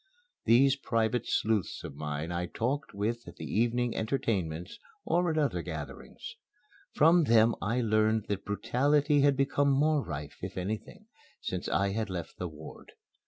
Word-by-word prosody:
These 135 +4 +5
private 115 -2 0
sleuths 105 -5 0
of - - -7
mine 75 +3 -4
I 85 0 -2
talked 135 +10 -2
with 115 +4 -2
at - - -10
the - - -7
evening 120 +2 0
entertainments 95 - -2 0.3
or 175 0 +2
at 160 - -1
other 140 - +1
gatherings. 80 -4 -8 0.6
From 165 +2 +5
them 115 -1 +5
I 115 +5 0
learned 110 -1 +2
that 100 -1 -2
brutality 145 +7 +2
had 140 -1 +4
become 140 +1 +2
more 145 +1 +3
rife, 75 -2 -7
if 95 +1 -6
anything, 105 - -5 0.3
since 90 -1 -4
I 100 0 +1
had 110 +1 -2
left 85 -3 -6
the 90 - -2
ward. 80 0 -12
110 Hz, 155 wpm, -30 LUFS, 90-135 Hz, 0.6 s, These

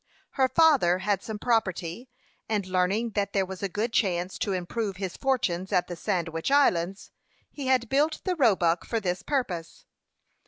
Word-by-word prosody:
Her 265 -1 +2
father 265 - +4
had 195 0 0
some 220 -1 -6
property, 215 -1 -1 0.4
and 210 -3 0
learning 185 +5 0
that 200 -1 -2
there 195 -1 +2
was 190 0 -8
a 200 - -1
good 220 +5 -2
chance 180 -4 0
to 205 - -1
improve 190 +2 -3
his 190 -2 -4
fortunes 195 -9 -1
at 180 - +2
the 175 - -6
Sandwich 165 0 -2
Islands, 195 -10 +2 0.4
he 280 -3 -6
had 255 -2 +2
built 300 +5 +1
the 370 -1 -1
Roebuck 185 - +3
for 230 - -2
this 180 -2 -2
purpose. 190 - -3
200 Hz, 165 wpm, -27 LUFS, 180-245 Hz, 0.4 s, father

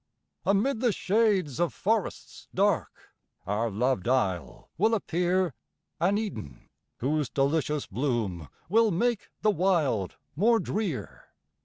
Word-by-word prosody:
Amid 215 +6 +2
the 240 -1 +3
shades 195 - +1
of 175 -1 0
forests 220 0 -2
dark, 200 -2 0 0.3
Our 105 +4 0
loved 115 0 0
isle 95 -9 -1
will 220 +6 +3
appear 180 -3 0 0.5
An 195 +4 +2
Eden, 195 - -5 0.3
whose 145 +2 0
delicious 150 +1 0
bloom 110 - -2 0.2
Will 225 +5 +4
make 225 +4 0
the 215 - +5
wild 160 - +1 0.2
more 225 +8 +4
drear. 200 -12 -3
175 Hz, 115 wpm, -28 LUFS, 130-210 Hz, 0.5 s, the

